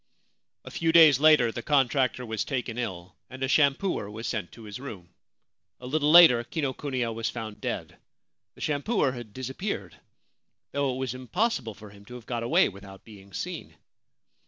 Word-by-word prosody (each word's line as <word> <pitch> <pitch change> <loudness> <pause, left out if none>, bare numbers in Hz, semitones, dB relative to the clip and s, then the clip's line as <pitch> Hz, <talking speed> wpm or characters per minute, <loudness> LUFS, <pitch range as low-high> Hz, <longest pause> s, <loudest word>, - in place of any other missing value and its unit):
A - - -9
few 165 -1 0
days 160 -5 +7
later 150 -6 +5
the 120 - -6
contractor 130 -2 +1
was 110 -1 -2
taken 125 -4 -3
ill, 95 -6 -5
and 130 +1 -7
a - - +1
shampooer 140 - +1
was 110 +2 -7
sent 105 -5 -3
to 115 - -13
his 105 +2 -8
room. 95 -10 -10 0.7
A 125 - -11
little 150 +3 0
later 155 -8 +8
Kinokuniya 130 -3 -3
was 115 0 -2
found 110 -2 -7
dead; - - -4 0.6
the - - -15
shampooer 145 - 0
had 120 -4 -9
disappeared, 130 - -5 0.8
though 140 -1 0
it - - -6
was 130 -2 -3
im 130 0 -10
possible 170 - -1
for 105 -2 -13
him 100 0 -16
to 125 - -11
have 120 -2 -11
got 120 -2 -3
away 115 - +3
without 95 0 -12
being 100 -3 -15
seen - - -6
125 Hz, 175 wpm, -27 LUFS, 110-140 Hz, 0.8 s, later